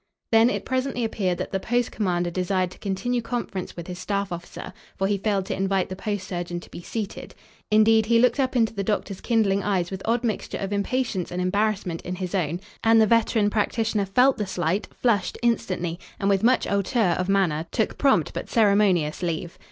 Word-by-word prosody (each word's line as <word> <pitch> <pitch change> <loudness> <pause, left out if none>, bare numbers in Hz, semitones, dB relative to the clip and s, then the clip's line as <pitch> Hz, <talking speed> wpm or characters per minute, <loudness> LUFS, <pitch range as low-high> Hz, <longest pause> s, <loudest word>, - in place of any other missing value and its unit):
Then 225 +1 +6
it - - -3
presently 260 -1 -1
appeared 190 -5 -1
that - - -4
the 195 - -1
post 240 +4 0
commander 175 -4 -1
desired 185 0 0
to - - -14
continue 240 +5 -1
conference 230 -7 -4
with 170 - -6
his 180 0 -7
staff 200 0 -2
officer, 175 0 -7 0.2
for 195 - 0
he 200 0 0
failed 200 -2 0
to - - -3
invite 195 -1 0
the 185 - -5
post 200 0 -4
surgeon 175 -2 -4
to - - -15
be - - -8
seated. 210 +2 -6 0.3
Indeed, 220 +1 +4
he 230 0 +4
looked 245 +2 +3
up 260 -1 0
into 225 -3 +2
the 200 -2 -2
doctor's 200 -1 -2
kindling 210 -4 +2
eyes 190 -4 0
with 190 0 -5
odd 230 +2 +1
mixture 220 -4 -2
of 195 +1 -3
impatience 205 -2 -1
and 180 - -3
embarrassment 190 -2 0
in 180 - -5
his 185 0 -5
own, 175 -2 -1 0.2
and 225 0 +5
the 220 - +6
veteran 220 -1 +2
practitioner 215 -1 0
felt 250 +7 +4
the 210 - -2
slight, 180 +2 -1
flushed 220 -6 0
instantly, 185 -7 0 0.2
and, 195 - +1
with 195 -1 +3
much 245 +3 +3
hauteur 200 -1 +1
of 185 +1 -1
manner, 170 -5 +1
took 220 - -1
prompt 265 - +3
but - - -5
ceremonious 200 -8 +3
leave. 170 -1 -3
200 Hz, 200 wpm, -24 LUFS, 185-225 Hz, 0.3 s, Then